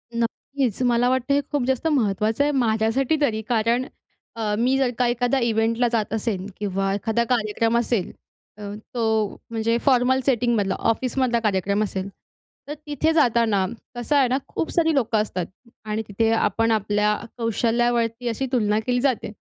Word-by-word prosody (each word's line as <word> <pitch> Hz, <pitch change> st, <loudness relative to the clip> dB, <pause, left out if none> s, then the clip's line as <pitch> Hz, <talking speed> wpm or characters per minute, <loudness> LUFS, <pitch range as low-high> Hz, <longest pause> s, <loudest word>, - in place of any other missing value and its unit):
नक्कीच, 240 Hz, +1 st, -2 dB
मला 245 Hz, 0 st, +3 dB
वाटतं 260 Hz, +1 st, +1 dB
हे 285 Hz, -, +3 dB
खूप 290 Hz, -3 st, 0 dB
जास्त 265 Hz, +4 st, 0 dB
महत्त्वाचं 220 Hz, -2 st, +1 dB
आहे 295 Hz, -, +1 dB
माझ्यासाठी 245 Hz, +2 st, +1 dB
तरी, 220 Hz, -6 st, +1 dB
कारण 235 Hz, +2 st, +1 dB, 0.5 s
अ, 215 Hz, -2 st, -2 dB
मी 255 Hz, +4 st, +2 dB
जर 265 Hz, -2 st, +1 dB
का 250 Hz, -, +3 dB
एखादा 245 Hz, +2 st, +1 dB
इव्हेंटला 230 Hz, +1 st, +1 dB
जात 220 Hz, -3 st, -1 dB
असेन 210 Hz, -4 st, -2 dB
किंवा 195 Hz, -1 st, -1 dB
एखादा 225 Hz, +3 st, 0 dB
कार्यक्रम 230 Hz, -1 st, +1 dB
असेल, 235 Hz, -5 st, 0 dB, 0.5 s
अ, -, -, -12 dB, 0.3 s
तो 220 Hz, -3 st, 0 dB, 0.2 s
म्हणजे 230 Hz, +1 st, 0 dB
फॉर्मल 260 Hz, -1 st, +3 dB
सेटिंगमधला 235 Hz, -6 st, +1 dB, 0.2 s
ऑफिसमधला 250 Hz, 0 st, 0 dB
कार्यक्रम 200 Hz, -1 st, 0 dB
असेल, 190 Hz, -2 st, -3 dB, 0.6 s
तर 295 Hz, -, -4 dB
तिथे 305 Hz, +2 st, +1 dB
जाताना 230 Hz, -9 st, +3 dB, 0.3 s
कसं 240 Hz, +5 st, -1 dB
आहे 275 Hz, -2 st, +4 dB
ना, 255 Hz, +2 st, +1 dB
खूप 325 Hz, -, -3 dB
सारी 325 Hz, -2 st, +2 dB
लोकं 230 Hz, -4 st, +1 dB
असतात 185 Hz, -4 st, -3 dB, 0.4 s
आणि 215 Hz, +1 st, -2 dB
तिथे 225 Hz, +2 st, 0 dB
आपण 225 Hz, +1 st, +1 dB
आपल्या 210 Hz, 0 st, +1 dB, 0.2 s
कौशल्यावरती 235 Hz, +1 st, 0 dB
अशी 235 Hz, +4 st, -2 dB
तुलना 215 Hz, -4 st, +2 dB
केली 245 Hz, -1 st, +1 dB
जाते. 260 Hz, -5 st, 0 dB
230 Hz, 155 wpm, -23 LUFS, 215-250 Hz, 0.6 s, आहे